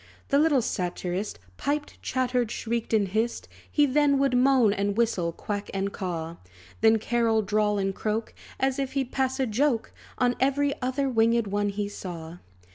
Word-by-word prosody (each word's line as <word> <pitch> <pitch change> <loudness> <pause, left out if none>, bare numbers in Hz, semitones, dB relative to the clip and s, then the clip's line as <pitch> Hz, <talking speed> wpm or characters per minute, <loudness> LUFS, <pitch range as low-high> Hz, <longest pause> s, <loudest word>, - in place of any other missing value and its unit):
The 280 - +4
little 295 -5 +3
satirist 180 - -3 0.2
Piped, 295 +1 -3
chattered, 250 -2 0
shrieked, 230 0 -3
and 210 -3 +3
hissed; 220 +5 -1 0.2
He 295 - +4
then 285 0 +3
would 270 -2 +2
moan, 250 -4 +4
and 200 0 -1
whistle, 195 -8 +1
quack, 205 +4 -5
and 195 +1 -1
caw; 170 -3 -4 0.4
Then, 225 0 +6
carol, 225 0 +1
drawl, 210 +1 +1
and 195 -1 0
croak, 220 +3 -2 0.3
As 265 +1 +1
if 270 -1 -2
he'd 270 -2 -1
pass 265 0 0
a 265 - +2
joke 235 +1 0 0.3
On 245 -1 +2
every 280 +2 +2
other 260 +2 0
winged 230 -2 +3
one 205 +1 0
he 200 0 -2
saw. 175 -4 -7
230 Hz, 165 wpm, -26 LUFS, 205-265 Hz, 0.4 s, Then